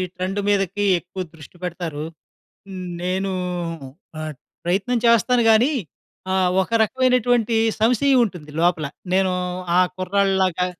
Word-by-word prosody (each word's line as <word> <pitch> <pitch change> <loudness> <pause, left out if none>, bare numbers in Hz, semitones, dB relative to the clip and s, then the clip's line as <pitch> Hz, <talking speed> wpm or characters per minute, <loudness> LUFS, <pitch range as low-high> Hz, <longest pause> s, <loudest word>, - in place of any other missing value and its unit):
Trend 185 +2 -2
మీదకి 205 0 +1
ఎక్కువ 180 +2 -9
దృష్టి 160 +2 -14
పెడతారు. 170 -4 -4 1.0
నేనూ 190 +2 -1 0.9
ఆహ్, 155 0 -4 0.3
ప్రయత్నం 195 +7 0
చేస్తాను 235 +1 +4
గాని 225 +6 +5 0.6
ఆహ్, 185 -1 +3
ఒక 190 - -7
రకవైనటువంటి 245 -1 +2 0.2
సంశయవుంటుంది 225 - +2
లోపల. 170 -3 +2 0.3
నేను 190 -1 +2 0.5
ఆ - - +7 0.2
కుర్రాడి‌లాగా 190 -1 +1
195 Hz, 100 wpm, -22 LUFS, 180-230 Hz, 1.0 s, ఆ